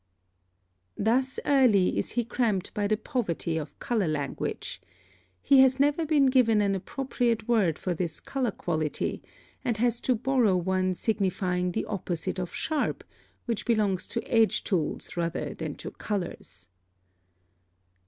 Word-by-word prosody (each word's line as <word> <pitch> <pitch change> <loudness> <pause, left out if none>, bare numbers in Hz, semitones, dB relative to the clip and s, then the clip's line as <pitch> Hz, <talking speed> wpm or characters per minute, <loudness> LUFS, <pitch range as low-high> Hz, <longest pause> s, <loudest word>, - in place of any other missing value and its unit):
(5) - - -2
Thus 260 +4 +1
early 245 -10 +4
is - - -2
he 240 -1 0
cramped 220 -6 -1
by 205 -1 0
the 215 +1 +1
poverty 205 - -2
of 155 -2 -5
color 220 -7 0
language. 145 -3 -3 0.6
He 275 - +6
has 265 0 +5
never 295 +3 +2
been 295 -3 +4
given 250 -5 +4
an 200 -1 +2
appropriate 235 +2 -1
word 205 -10 +2
for 180 - -2
this 170 -2 -3
color 260 -3 -2
quality, 155 -6 -2 0.4
and 235 -3 0
has 235 +1 +1
to 255 - +2
borrow 235 -5 +2
one 185 +1 0
signifying 180 -4 0
the - - -1
opposite 185 -3 -3
of 180 -1 -4
sharp, 310 -2 -1 0.4
which 230 -3 -2
belongs 205 -5 +1
to 235 - -3
edge 225 -2 +3
tools 170 -7 -2
rather 170 -1 -2
than - - -5
to - - -8
colors. 180 - -5
215 Hz, 145 wpm, -27 LUFS, 180-245 Hz, 0.6 s, He